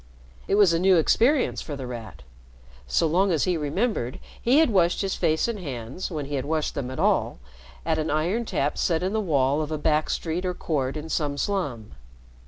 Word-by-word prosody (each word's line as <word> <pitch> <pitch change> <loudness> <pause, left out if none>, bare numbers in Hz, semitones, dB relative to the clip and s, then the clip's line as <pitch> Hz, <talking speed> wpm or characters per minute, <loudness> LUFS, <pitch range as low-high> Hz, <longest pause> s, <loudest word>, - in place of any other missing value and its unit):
It - - +2
was 200 -5 +5
a 165 - +2
new 185 0 +5
experience 245 - +2
for 150 - -6
The 135 -2 -6
Rat. 110 - -8 0.6
So 60 - +2
long 185 +5 +2
as 160 -4 +1
he 180 - +1
remembered, 150 - -1 0.2
he 250 +4 +3
had 320 -6 +4
washed 175 -4 +2
his 195 - -1
face 160 +5 +1
and 230 -3 -3
hands 135 0 -5
when 155 -5 -4
he 145 - -7
had 135 -1 -1
washed 155 0 -1
them 140 -4 -4
at 130 - -6
all - - +1 0.5
at 160 -1 +1
an 155 - -1
iron 175 +10 0
tap 150 -8 -1
set 165 -1 +1
in 190 +2 -1
the 220 - +1
wall 145 -5 +1
of 155 0 -4
a 155 - -1
back 150 +1 +1
street 170 +2 -2
or 180 -1 -2
court 140 -4 -2
in 155 +1 -6
some 145 -2 -1
slum. 140 - -2
160 Hz, 210 wpm, -25 LUFS, 140-185 Hz, 0.6 s, was